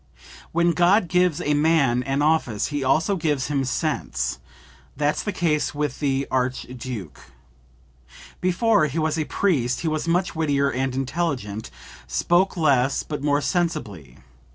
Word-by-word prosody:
"When 170 Hz, +1 st, +3 dB
God 175 Hz, +4 st, +3 dB
gives 180 Hz, -1 st, +2 dB
a 150 Hz, -3 st, +1 dB
man 145 Hz, -5 st, +3 dB
an 135 Hz, +3 st, -1 dB
office 150 Hz, -9 st, +1 dB
he 145 Hz, -2 st, -1 dB
also 160 Hz, +9 st, +2 dB
gives 150 Hz, -6 st, -1 dB
him 140 Hz, -2 st, 0 dB
sense; 150 Hz, +4 st, -2 dB, 0.6 s
that's 150 Hz, +1 st, +1 dB
the 205 Hz, -, -3 dB
case 155 Hz, -5 st, 0 dB
with 145 Hz, -3 st, -2 dB
the 135 Hz, -2 st, 0 dB
Archduke. 125 Hz, -, -3 dB, 1.2 s
Before 185 Hz, -1 st, +3 dB
he 145 Hz, +3 st, -5 dB
was 155 Hz, 0 st, 0 dB
a 155 Hz, -, 0 dB
priest 130 Hz, -12 st, 0 dB
he 170 Hz, -, -2 dB
was 155 Hz, +1 st, -1 dB
much 180 Hz, +2 st, 0 dB
wittier 140 Hz, -3 st, +1 dB
and 130 Hz, 0 st, -2 dB
intelligent; 130 Hz, -7 st, -3 dB, 0.4 s
spoke 175 Hz, -, +1 dB
less 135 Hz, -4 st, +2 dB
but 150 Hz, -2 st, -5 dB
more 145 Hz, 0 st, +1 dB
sensibly. 125 Hz, -, -2 dB
150 Hz, 140 wpm, -23 LUFS, 130-165 Hz, 1.2 s, When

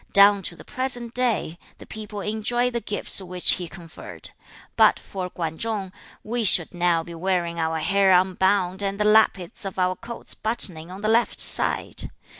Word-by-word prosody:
Down 200 Hz, 0 st, +6 dB
to 170 Hz, -, -6 dB
the -, -, -14 dB
present 245 Hz, -2 st, -3 dB
day, 225 Hz, -10 st, -1 dB, 0.2 s
the -, -, -13 dB
people 210 Hz, -1 st, -7 dB
enjoy 240 Hz, +4 st, -1 dB
the 235 Hz, -1 st, -3 dB
gifts 205 Hz, -1 st, -1 dB
which 180 Hz, -1 st, +1 dB
he 180 Hz, -, -2 dB
conferred. 170 Hz, -2 st, -11 dB, 0.4 s
But -, -, +5 dB
for 185 Hz, -2 st, -6 dB
Kwan 160 Hz, -3 st, -5 dB
Chung, 210 Hz, -4 st, -3 dB, 0.3 s
we 235 Hz, +2 st, -2 dB
should 175 Hz, -4 st, +4 dB
now 175 Hz, -2 st, +1 dB
be 170 Hz, -, -10 dB
wearing 170 Hz, -1 st, -2 dB
our 160 Hz, 0 st, -1 dB
hair 195 Hz, +4 st, +2 dB
unbound, 185 Hz, +1 st, +2 dB
and 200 Hz, 0 st, -3 dB
the 210 Hz, -, +1 dB
lappets 210 Hz, -4 st, +2 dB
of 195 Hz, -1 st, -5 dB
our 185 Hz, 0 st, +1 dB
coats 230 Hz, +4 st, -8 dB
buttoning 180 Hz, -7 st, +2 dB
on 190 Hz, +3 st, -10 dB
the -, -, 0 dB
left 230 Hz, +2 st, +1 dB
side. -, -, +1 dB
195 Hz, 175 wpm, -23 LUFS, 175-215 Hz, 0.4 s, Down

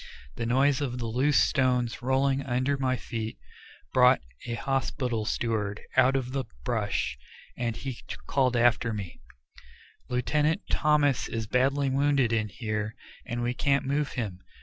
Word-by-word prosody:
The 115 Hz, -, -3 dB
noise 135 Hz, +3 st, +3 dB
of 125 Hz, -3 st, -2 dB
the 120 Hz, -, -3 dB
loose 130 Hz, +6 st, +2 dB
stones 125 Hz, -4 st, +1 dB
rolling 135 Hz, +2 st, +2 dB
under 130 Hz, +2 st, 0 dB
my 130 Hz, -2 st, 0 dB
feet 110 Hz, -, -5 dB, 0.6 s
brought -, -, +6 dB, 0.3 s
a 120 Hz, -, -2 dB
hospital 125 Hz, -3 st, -1 dB
steward 105 Hz, -3 st, -1 dB, 0.2 s
out 130 Hz, +2 st, +5 dB
of 130 Hz, -2 st, -1 dB
the 135 Hz, 0 st, -2 dB, 0.2 s
brush, 105 Hz, -, -1 dB, 0.4 s
and 115 Hz, -2 st, -2 dB
he 130 Hz, -1 st, -5 dB, 0.3 s
called 130 Hz, -3 st, +2 dB
after 115 Hz, -1 st, +3 dB
me: 100 Hz, -5 st, -6 dB, 0.9 s
"Lieutenant 150 Hz, -, +1 dB
Thomas 150 Hz, -4 st, +2 dB
is 115 Hz, -1 st, -3 dB
badly 135 Hz, +4 st, +1 dB
wounded 140 Hz, -3 st, +2 dB
in 110 Hz, -2 st, 0 dB
here, 110 Hz, 0 st, -3 dB, 0.3 s
and 120 Hz, -1 st, -2 dB
we 120 Hz, +1 st, 0 dB
can't 140 Hz, +2 st, +1 dB
move 140 Hz, +2 st, 0 dB
him. 105 Hz, -8 st, -4 dB
125 Hz, 145 wpm, -28 LUFS, 115-135 Hz, 0.9 s, brought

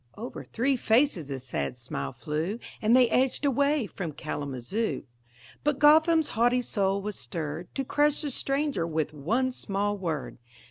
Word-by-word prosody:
Over 235 Hz, +4 st, -6 dB
three 260 Hz, +3 st, 0 dB
faces 225 Hz, -, +2 dB
a 135 Hz, -, -3 dB
sad 70 Hz, -, -3 dB
smile 70 Hz, -1 st, -4 dB
flew, 160 Hz, +7 st, -3 dB, 0.2 s
And 220 Hz, +3 st, +4 dB
they 255 Hz, -1 st, +6 dB
edged 260 Hz, +3 st, +2 dB
away 280 Hz, 0 st, +2 dB
from 180 Hz, -5 st, -5 dB
Kalamazoo. 145 Hz, -, -3 dB, 0.6 s
But 295 Hz, -2 st, +1 dB
Gotham's 315 Hz, +2 st, +5 dB
haughty 245 Hz, +2 st, +2 dB
soul 195 Hz, -3 st, 0 dB
was 210 Hz, -1 st, -4 dB
stirred 155 Hz, +5 st, -4 dB
To 270 Hz, -, -1 dB
crush 295 Hz, +3 st, +2 dB
the 290 Hz, -, -2 dB
stranger 275 Hz, -, -1 dB
with 155 Hz, -2 st, -1 dB
one 230 Hz, -, 0 dB
small 205 Hz, -3 st, -1 dB
word. 165 Hz, -10 st, -4 dB
215 Hz, 150 wpm, -28 LUFS, -, 0.6 s, they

